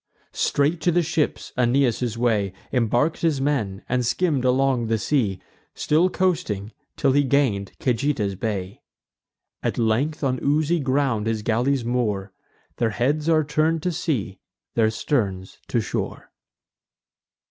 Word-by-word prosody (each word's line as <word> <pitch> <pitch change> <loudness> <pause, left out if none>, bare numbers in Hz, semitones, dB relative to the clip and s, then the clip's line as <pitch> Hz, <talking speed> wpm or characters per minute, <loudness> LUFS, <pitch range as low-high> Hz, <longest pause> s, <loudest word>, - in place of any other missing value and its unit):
Straight 150 +4 +1
to 175 - +2
the 175 +1 +2
ships 160 -1 -1
Aeneas 125 0 +2
took - - -12
his 120 -2 -2
way, 110 -5 +1 0.2
Embark'd 125 +5 +1
his 160 -5 +1
men, 115 -9 -1
and 125 0 0
skimm'd 140 +2 +1
along 130 -2 +2
the 115 0 +1
sea, 105 -5 0 0.4
Still 165 +5 +2
coasting, 115 - -1 0.3
till 140 - +3
he 145 +2 +3
gain'd 130 -8 +1
Cajeta's 120 -5 0
bay. 100 -1 -4 0.8
At - - -2
length 120 +8 0
on 130 -2 0
oozy 155 +4 +2
ground 130 -5 0
his 110 -2 -1
galleys 120 +3 +1
moor; 105 -5 -1 0.4
Their 115 - +1
heads 145 +8 0
are 155 -1 +4
turn'd 155 +2 0
to 180 - 0
sea, 130 - -2 0.3
their 110 -2 +3
sterns 100 -6 -2
to - - +1
shore. - - -4
125 Hz, 140 wpm, -23 LUFS, 110-150 Hz, 0.8 s, are